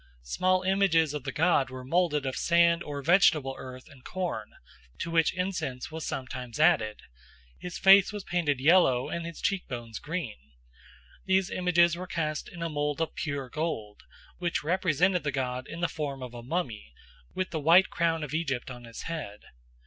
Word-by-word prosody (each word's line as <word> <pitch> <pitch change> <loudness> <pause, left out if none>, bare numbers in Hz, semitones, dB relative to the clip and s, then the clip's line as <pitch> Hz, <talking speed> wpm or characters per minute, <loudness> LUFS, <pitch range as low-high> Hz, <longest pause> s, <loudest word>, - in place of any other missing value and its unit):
Small 185 - +1
images 185 -5 +3
of 150 -2 -5
the 135 - -2
god 150 -4 +2
were 130 0 -8
moulded 150 -1 +1
of 130 - -2
sand 170 0 +3
or 145 -3 -5
vegetable 155 -5 +4
earth 130 0 -9
and 135 -3 -17
corn, 185 -2 -4 0.5
to 165 - -4
which 165 -2 +3
incense 180 -9 -3
was 160 0 -5
sometimes 130 0 -5
added; 110 -10 +3 0.6
his 180 -1 -6
face 195 +1 +7
was 205 -2 -6
painted 165 -8 0
yellow 135 -4 +4
and 170 0 -4
his 170 - -8
cheek 195 -2 -1
bones 120 -4 -6
green. 155 -7 -4 0.9
These 190 0 +2
images 175 -1 +3
were 180 +1 -7
cast 155 -3 -3
in 170 -1 -7
a - - 0
mould 145 -1 -2
of 165 - -1
pure 145 -4 -3
gold, 125 -9 -4 0.4
which 175 -3 -1
represented 180 +1 +2
the 145 - -1
god 130 -1 -3
in 170 - -7
the 175 - +2
form 140 -5 -5
of 125 -1 -8
a 120 - -8
mummy, 125 - -4 0.4
with 185 - -2
the 160 - -2
white 170 +6 +5
crown 165 -1 0
of 150 -1 -6
Egypt 140 -6 -2
on 120 -1 -9
his 115 0 -9
head. 150 -12 -6
160 Hz, 180 wpm, -28 LUFS, 130-175 Hz, 0.9 s, face